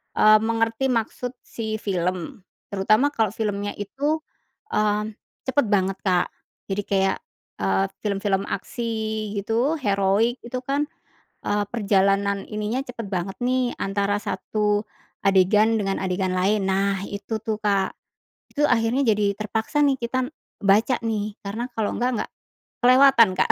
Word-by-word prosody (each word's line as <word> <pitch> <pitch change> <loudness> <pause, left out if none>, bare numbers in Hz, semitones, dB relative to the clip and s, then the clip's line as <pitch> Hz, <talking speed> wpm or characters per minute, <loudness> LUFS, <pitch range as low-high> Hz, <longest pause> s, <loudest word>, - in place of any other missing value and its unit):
eee, 215 0 +7
mengerti 225 +3 +1
maksud 235 +2 -2
si 220 -2 -4
film. 180 -3 -2 0.3
Terutama 215 +8 +3
kalau 220 -4 +2
filmnya 205 -2 -2
itu, 285 +10 -1 0.5
mmm, 210 0 +1 0.4
cepet 260 0 +2
banget 195 -2 +1
Kak, 180 -2 +2 0.4
jadi 200 +1 -1
kayak, 195 -1 +2 0.4
eee, 95 0 +2 0.2
film-film 200 -1 0
aksi 230 +4 -3 0.5
gitu, 230 +9 +1
heroik 205 +2 +2
itu 250 +2 -3
kan, 280 +3 0 0.6
eee, 205 0 +1
perjalanan 200 -2 +2
ininya 215 +4 -2
cepat 235 -3 -6
banget 190 0 -2
nih 255 0 +1
antara 200 +1 0
1 210 -1 0 0.4
adegan 200 +3 +4
dengan 195 -1 -1
adegan 185 0 0
lain. 195 +2 +2
Nah 195 0 +1
itu 205 +2 -4
tuh, 220 -1 -2
Kak, 200 -2 +1 0.6
itu 295 - -1
akhirnya 245 +2 +2
jadi 205 -2 +2
terpaksa 220 +7 -1
nih 275 -2 +2
kita 255 +2 -1 0.4
baca 210 +6 +4
nih 215 -2 -2
karena 220 +5 -3
kalau 215 -2 0
enggak 250 +1 +1
nggak - - -13 0.5
kelewatan, 255 -3 +7
Kak. - - +4
210 Hz, 135 wpm, -24 LUFS, 195-230 Hz, 0.6 s, eee